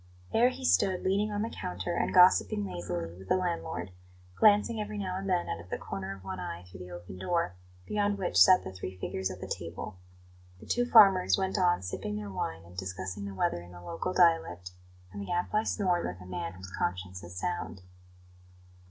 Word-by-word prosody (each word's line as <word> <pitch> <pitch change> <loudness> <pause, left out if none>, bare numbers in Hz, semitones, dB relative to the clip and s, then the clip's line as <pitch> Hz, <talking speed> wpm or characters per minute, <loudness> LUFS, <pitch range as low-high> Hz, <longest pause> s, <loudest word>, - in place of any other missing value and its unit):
There 240 +2 +5
he 260 +1 -6
stood 190 -6 +3
leaning 200 +3 +1
on 205 0 -1
the 225 - -2
counter 90 - -3
and - - 0
gossiping 180 - +5
lazily 85 -2 -4
with 95 - -12
the - - +4
landlord, 170 - -3 0.4
glancing 215 +2 +4
every 210 0 -5
now 185 -2 -3
and 195 +1 -4
then 180 -2 +1
out 85 - -3
of 85 +2 -12
the - - -2
corner 95 0 -5
of 95 - -15
one 95 -1 -5
eye 90 -1 -5
through 90 0 -13
the 90 0 -8
open 90 +1 -9
door, 170 - 0 0.3
beyond 205 -1 0
which 190 -2 -2
sat 185 -1 +7
the 95 - -6
three 95 0 -7
figures 95 +1 -3
at 95 0 -8
the - - -5
table. 85 +4 -6 0.6
The - - -13
two 245 0 +1
farmers 195 -6 +7
went 190 +1 0
on 175 - +3
sipping 100 +3 -4
their 105 -1 -5
wine 80 -3 -4
and 85 +1 -15
discussing 95 +1 -5
the 100 -1 -6
weather 85 -2 0
in 85 +1 -13
the 90 - -11
local 85 - -3
dialect, 165 - +2 0.4
and 100 - -6
the 100 - -6
Gadfly 195 +5 0
snored 180 -4 +1
like 90 +1 -6
a 90 - -11
man 90 -1 -4
whose 95 0 -9
conscience 90 +1 -3
is 85 +1 -10
sound. 140 - -3
100 Hz, 205 wpm, -30 LUFS, -, 0.6 s, sat